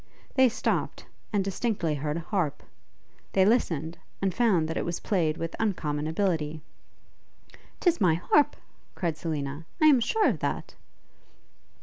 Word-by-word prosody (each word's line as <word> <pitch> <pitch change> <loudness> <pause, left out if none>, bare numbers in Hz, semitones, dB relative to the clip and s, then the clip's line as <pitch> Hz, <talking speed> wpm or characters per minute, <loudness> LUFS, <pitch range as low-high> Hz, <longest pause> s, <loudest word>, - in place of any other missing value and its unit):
They 260 -2 +5
stopped, 230 - -2 0.3
and 205 -3 +1
distinctly 195 -4 -1
heard 150 +2 -2
a - - -3
harp; 170 -5 -2 0.7
they 190 -1 +5
listened, 170 - +1 0.2
and 190 -2 0
found 190 -8 +3
that 160 - -3
it - - -1
was 170 0 -3
played 165 -7 0
with 165 0 -4
uncommon 155 -8 -1
ability. 160 -3 -1 1.2
''Tis 345 -2 +2
my 175 -5 +4
harp!' 285 - +3 0.4
cried 170 -5 -1
Selina, 150 -1 -4
'I 310 - +4
am 290 -5 +7
sure 430 - +2
of - - 0
that!' - - -3
170 Hz, 140 wpm, -27 LUFS, 155-215 Hz, 1.2 s, am